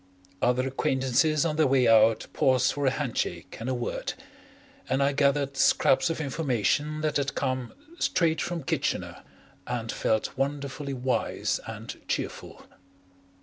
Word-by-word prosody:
Other 125 +1 +2
acquaintances 135 +3 +1
on 155 -2 -1
their 155 -2 +4
way 130 -2 +3
out 110 0 +5
paused 130 -1 +3
for 145 -1 -1
a - - +6
handshake 115 - -3
and 115 +3 -4
a 130 - 0
word, 120 -1 -3 0.7
and 135 +2 +2
I 140 - +3
gathered 140 0 +1
scraps 135 - +4
of 165 - -2
information 145 0 0
that 155 -1 +1
had 140 0 -2
come 130 -2 -2 0.2
"straight 165 -2 +1
from 170 -3 -3
Kitchener," - - -2 0.5
and 115 -2 -3
felt 110 -1 -1
wonderfully 140 0 -3
wise 130 0 -1
and - - -8
cheerful. - - -4
135 Hz, 140 wpm, -27 LUFS, 125-145 Hz, 0.7 s, a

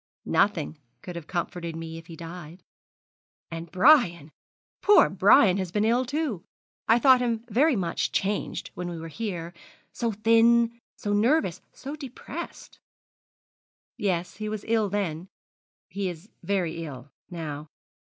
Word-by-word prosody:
'Nothing 165 -6 +1 0.2
could 180 - -7
have 170 -2 -7
comforted 170 -2 -3
me 165 0 -6
if 165 - -16
he 170 - -10
had - - -10
died.' 170 +1 -9 0.9
'And 165 0 -7
Brian 180 - +4 0.5
poor 415 0 +6
Brian 190 -3 +5
has 185 -3 -3
been 210 +3 +1
ill, 240 +3 +2
too. 270 - -2 0.4
I 225 - +6
thought 260 0 +6
him 230 -2 -1
very 280 +6 +4
much 180 -5 -1
changed 200 +1 -2
when 180 0 -5
we 170 - -5
were 165 0 -7
here 175 -3 -5 0.4
so 235 -1 -1
thin, 230 +2 +3
so 205 - -3
nervous, 210 - +2
so 280 +3 -7
depressed.' 275 -5 -8 1.2
'Yes, 180 -4 -2
he 215 0 -4
was 215 -1 -5
ill 220 -2 +2
then 185 -4 -2 0.6
he 200 -2 -3
is 175 +4 -10
very 175 -4 -1
ill 140 -3 -9 0.2
now. 155 -3 -6
195 Hz, 140 wpm, -26 LUFS, 170-230 Hz, 1.2 s, poor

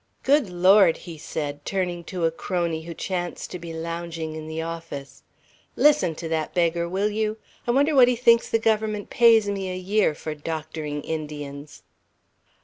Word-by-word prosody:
"Good 275 -5 +3
Lord!" 185 0 +5
he 165 -3 -10
said, 145 -1 -4
turning 180 -2 -2
to 180 -2 -2
a 165 - +2
crony 170 -1 -2
who 170 - -6
chanced 175 -1 -4
to 180 - -5
be 170 0 -7
lounging 165 -1 -5
in 155 0 -7
the 160 0 -5
office. 165 -4 -7 0.5
"Listen 295 - +4
to 165 - -6
that 160 -1 -2
beggar, 170 -1 +1
will 200 +4 0
you? 215 +1 -1 0.3
I - - -2
wonder 285 +5 +3
what 260 -3 +7
he 250 - +2
thinks 235 -1 +4
the - - +3
Government 215 -2 0
pays 230 -3 +5
me 195 -2 -2
a 185 - -4
year 190 -3 +1
for 155 +1 -5
doctoring 155 -1 -5
Indians!" 150 -2 -6
170 Hz, 170 wpm, -24 LUFS, 160-210 Hz, 0.5 s, what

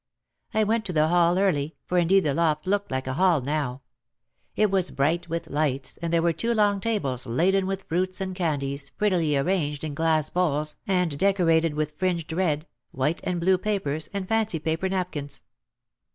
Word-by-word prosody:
I 220 - +4
went 220 +2 +1
to 185 - +4
the 155 0 +3
hall 175 0 +3
early, 165 -6 +1
for 180 - +1
indeed 190 +3 +4
the 150 -5 0
loft 155 -1 +1
looked 200 +2 0
like 130 0 -2
a 130 - -2
hall 175 +1 +3
now. 135 -1 -3 0.7
It 210 -2 +2
was 190 -2 +1
bright 165 +5 0
with 165 0 -4
lights 140 -2 -1
and 170 -1 -4
there 165 -1 +2
were 170 -1 +2
two 235 +7 0
long 205 -2 +3
tables 140 - -1
laden 185 +10 +2
with 195 0 -3
fruits 185 +3 -2
and 190 -1 -3
candies 140 -6 -2
prettily 175 -8 +1
arranged 150 -2 0
in 155 -2 -3
glass 160 0 +2
bowls 155 -4 0
and 180 -6 0
decorated 165 -5 +2
with 150 0 -3
fringed 175 -4 -1
red, 160 -3 0 0.2
white 150 +6 -1
and 180 -1 -1
blue 185 +2 +3
papers 170 -8 -2
and 200 -2 -4
fancy 220 -5 +1
paper 160 +4 -1
napkins. 165 -7 -3
170 Hz, 180 wpm, -25 LUFS, 150-190 Hz, 0.7 s, I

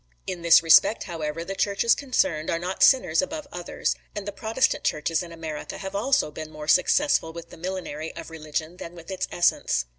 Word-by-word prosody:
In 180 -2 -5
this 170 0 +6
respect, 165 +7 +5
however, 165 0 -4
the 195 - -4
churches 200 +4 +2
concerned 190 - 0
are 165 - +1
not 180 +3 -5
sinners 250 - +5
above 300 +2 -5
others; 175 -1 -2 0.2
and 205 -1 -5
the - - -2
Protestant 220 +5 0
churches 155 +1 0
in 175 -1 -8
America 160 -2 -6
have 195 0 -6
also 265 - +1
been 155 +1 -7
more 155 -1 -9
successful 180 - +3
with 170 0 -10
the - - -11
millinery 165 -3 -5
of - - -8
religion 155 +2 -5
than 170 0 -9
with 170 +2 -10
its 185 -1 -2
essence. 60 - +1
170 Hz, 190 wpm, -25 LUFS, 160-200 Hz, 0.2 s, this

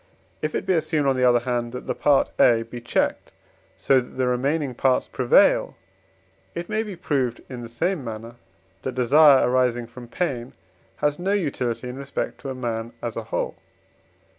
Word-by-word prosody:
If 155 0 -2
it - - -2
be 190 - +2
assumed, 155 -3 0
on 135 - +3
the 130 - 0
other 120 -1 +3
hand, 120 -1 -2
that 125 - -6
the - - -1
part, 145 -2 +2
A, 115 -1 +5
be 120 +1 -9
checked 120 - -1 0.5
so 135 - +3
that 125 - -13
the 130 - +1
remaining 135 +3 0
parts 130 +1 +1
prevail, 125 -2 +3 0.8
it 170 0 -4
may 215 +1 0
be 210 -4 -6
proved 135 -8 -1
in 125 -2 -7
the 115 - -8
same 165 +6 -1
manner 115 +1 -7 0.4
that 130 - -4
desire 140 +3 +6
arising 125 -1 +1
from 120 +1 -11
pain 125 -4 -3 0.4
has 145 - 0
no 190 +3 0
utility 130 - -2
in 125 +1 -6
respect 140 0 -4
to 135 - -5
a 130 - -4
man 115 -2 -4
as 120 -2 -3
a 115 - -5
whole. - - -3
130 Hz, 185 wpm, -24 LUFS, 120-145 Hz, 0.8 s, desire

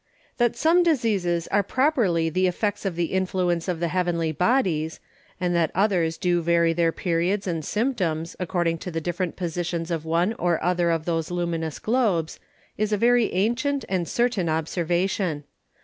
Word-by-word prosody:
That 240 -2 +2
some 330 +3 +4
Diseases 210 - +1
are 205 - +3
properly 210 - +1
the 185 +3 +1
Effects 205 +3 -2
of 190 -3 -1
the 170 -1 -1
Influence 180 -2 0
of 175 -3 -2
the 170 0 0
Heavenly 170 -2 0
Bodies, 170 - +1 0.4
and 180 -1 0
that 170 -2 +2
others 180 -5 +1
do 175 -1 +1
vary 170 0 +3
their 165 0 +2
Periods 180 +4 -1
and 165 -4 -2
Symptoms 180 - -1
according 175 -2 -1
to 180 - -6
the 165 -2 -2
different 175 +1 -3
Positions 170 -1 -3
of 165 -2 -2
one 170 +6 +1
or 175 -2 +2
other 175 0 +1
of 165 -1 0
those 165 -2 -1
Luminous 170 -3 -2
Globes, 215 -9 0 0.4
is 215 0 0
a 210 - +2
very 240 +1 +3
ancient 240 +8 0
and 180 -3 -1
certain 235 -8 0
Observation. 170 +1 -1
175 Hz, 165 wpm, -24 LUFS, 165-205 Hz, 0.4 s, some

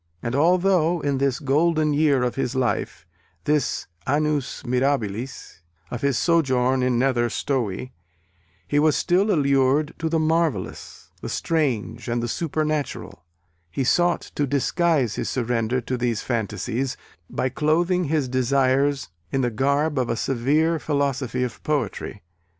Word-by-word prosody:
And 115 - -2
although 175 +2 +3
in 140 -2 0
this 135 -2 +1
golden 155 +2 +2
year 145 -3 +3
of 125 - 0
his 135 -1 -2
life, 130 -2 -1 0.4
this 150 -3 0 0.2
annus 145 -1 0
mirabilis 125 -6 -2 0.3
of 125 - -4
his 140 -4 +1
sojourn 130 -6 +2
at 125 0 +2
Nether 120 -1 +2
Stowey, 125 -3 -2 0.8
he 145 - +2
was 150 0 +3
still 190 +4 +2
allured 140 -2 +2
to 165 - -1
the 165 - +1
marvellous, 160 - -1
the - - -5
strange 120 -8 -1
and 120 0 -1
the - - -1
supernatural, 155 +1 -2 0.5
he 130 - -2
sought 175 +6 +2
to 145 - 0
disguise 140 - +1
his - - -2
surrender 120 0 0
to 125 +1 -3
these 120 -3 -1
phantasies, 120 +2 -2 0.3
by 130 - -1
clothing 170 +6 +1
his 150 -2 0
desires 130 +1 +1 0.2
in 135 - +1
the 120 -1 0
garb 140 +5 +1
of 125 - -1
a - - +1
severe 150 +8 +1
philosophy 140 -4 -1
of 125 -2 -5
poetry. 115 - -3
135 Hz, 140 wpm, -23 LUFS, 125-155 Hz, 0.8 s, although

